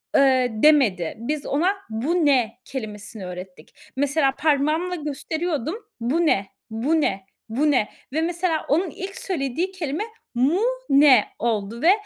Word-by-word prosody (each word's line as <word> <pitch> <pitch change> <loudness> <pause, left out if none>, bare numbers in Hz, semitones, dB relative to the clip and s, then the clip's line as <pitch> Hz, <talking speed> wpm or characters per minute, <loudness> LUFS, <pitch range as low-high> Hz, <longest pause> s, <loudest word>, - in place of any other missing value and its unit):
ııı, 260 -2 +5 0.2
demedi. 235 - +4
Biz 290 +5 -3
ona 350 +8 +1
"Bu 300 +10 0
ne?" 250 -6 +2
kelimesini 215 -4 -7
öğrettik. 180 -2 -9 0.2
Mesela, 275 +1 +2
parmağımla 310 +4 +1
gösteriyordum, 310 - -3 0.2
"Bu 280 +9 +1
ne, 195 -10 +2 0.2
bu 275 +9 +1
ne, 195 -8 -1 0.2
bu 290 +7 +2
ne?" 230 -6 +2 0.2
ve 315 - +1
mesela, 340 -1 -1
onun 335 +6 +2
ilk 385 +5 -7
söylediği 335 +1 -2
kelime 335 0 -3 0.3
"Mu 280 - +2 0.3
ne?" 275 -5 +6
oldu 225 0 -2
ve, 335 - +6
280 Hz, 135 wpm, -23 LUFS, 230-320 Hz, 0.3 s, ne